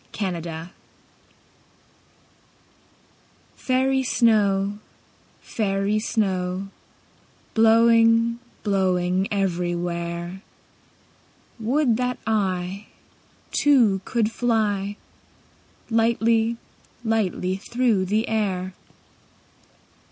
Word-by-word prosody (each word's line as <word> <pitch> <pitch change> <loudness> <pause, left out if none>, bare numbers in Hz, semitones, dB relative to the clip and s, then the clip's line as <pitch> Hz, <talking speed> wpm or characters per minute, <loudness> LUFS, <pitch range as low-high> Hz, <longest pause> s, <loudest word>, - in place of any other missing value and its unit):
Snow 185 -5 -3
Song 165 0 -7 2.9
FAIRY 265 +1 +1
snow, 205 -4 +2 0.6
fairy 200 0 -1
snow, 190 -3 -1 0.8
Blowing, 230 +1 +4 0.2
blowing 185 -2 +1
everywhere, 175 -1 -2 1.2
Would 240 +1 +1
that 250 0 -1
I 195 -2 -1 0.6
Too, 235 -10 +3
could 230 -3 0
fly 210 -4 0 0.9
Lightly, 225 0 +2 0.5
lightly 195 -4 0
through 225 -2 0
the 215 +4 0
air. 190 -4 -1
205 Hz, 60 wpm, -23 LUFS, 185-230 Hz, 2.9 s, Blowing